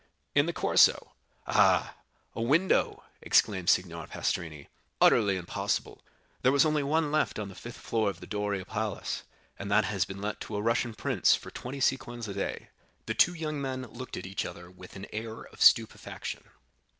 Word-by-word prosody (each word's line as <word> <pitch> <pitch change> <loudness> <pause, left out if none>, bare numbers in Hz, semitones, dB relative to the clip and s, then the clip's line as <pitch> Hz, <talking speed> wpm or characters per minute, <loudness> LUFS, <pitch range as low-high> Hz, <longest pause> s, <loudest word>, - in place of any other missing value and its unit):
"In - - +3
the - - 0
Corso." - - +3 0.3
"Ah, - - +3 0.4
a - - -4
window!" 155 +11 +2 0.2
exclaimed 95 -4 +2
Signor 85 -3 +1
Pastrini,—"utterly 90 +5 0
impossible; 90 -2 -3 0.4
there 130 - +4
was 140 +2 +4
only 155 -1 +2
one 150 +2 +1
left 155 -1 +1
on 105 -2 -4
the - - -10
fifth 120 +5 -9
floor 110 -3 0
of 100 - -7
the - - -10
Doria 105 -2 -2
Palace, 110 0 -3 0.4
and 100 - -5
that 105 +2 +4
has 100 -4 0
been 95 0 -8
let 105 +1 -4
to 105 - -6
a 105 - -1
Russian 115 0 0
prince - - +3
for - - -9
twenty 135 +3 -7
sequins 120 -3 -1
a 100 - -5
day." 100 - -4 0.4
The 110 - -2
two 175 +9 +4
young 155 -3 -3
men 130 -1 -3
looked 125 +3 -8
at - - -6
each 95 +1 -3
other 90 0 -9
with 90 0 -13
an 95 0 -7
air 110 +1 -5
of - - -15
stupefaction. - - +2
110 Hz, 175 wpm, -29 LUFS, 95-130 Hz, 0.4 s, there